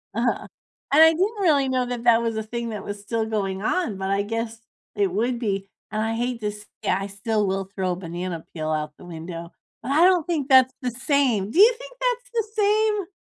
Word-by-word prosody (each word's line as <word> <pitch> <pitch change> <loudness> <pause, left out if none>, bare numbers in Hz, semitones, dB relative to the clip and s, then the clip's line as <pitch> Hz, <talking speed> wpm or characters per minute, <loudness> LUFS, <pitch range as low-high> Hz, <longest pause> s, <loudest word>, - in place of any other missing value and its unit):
Uh-huh, 235 +1 0 0.5
and 310 +2 +8
I 320 - +9
didn't 400 +6 -1
really 285 -7 +3
know 255 -1 +1
that 245 -1 -4
that 235 -1 +6
was 230 -1 -1
a 220 - -2
thing 235 +2 -4
that 210 -3 -5
was 205 0 -6
still 225 +2 -2
going 195 -3 -2
on, 230 - 0
but 190 0 -3
I 195 0 +2
guess 225 +2 -3 0.4
it 200 -3 +1
would 235 +5 0
be, 195 -4 -2 0.2
and 215 0 -1
I 225 +1 -1
hate 240 +1 -2
this 210 0 -4 0.2
Yeah, 185 - +2
I 195 - -4
still 205 +2 -1
will 195 0 -1
throw 185 -2 0
a - - -1
banana 175 -1 -5
peel 155 -1 -3
out 150 -1 -2
the - - -13
window. 170 0 -7 0.3
But - - -3
I 315 +5 +5
don't 360 -4 +4
think 305 -5 -2
that's 260 -1 +6
the 250 -1 -1
same. 250 -5 +1
Do 335 - 0
you 450 +5 +8
think - - -11
that's - - -1
the 460 -1 +1 0.2
same? 420 -1 +2
225 Hz, 225 wpm, -24 LUFS, 195-280 Hz, 0.5 s, I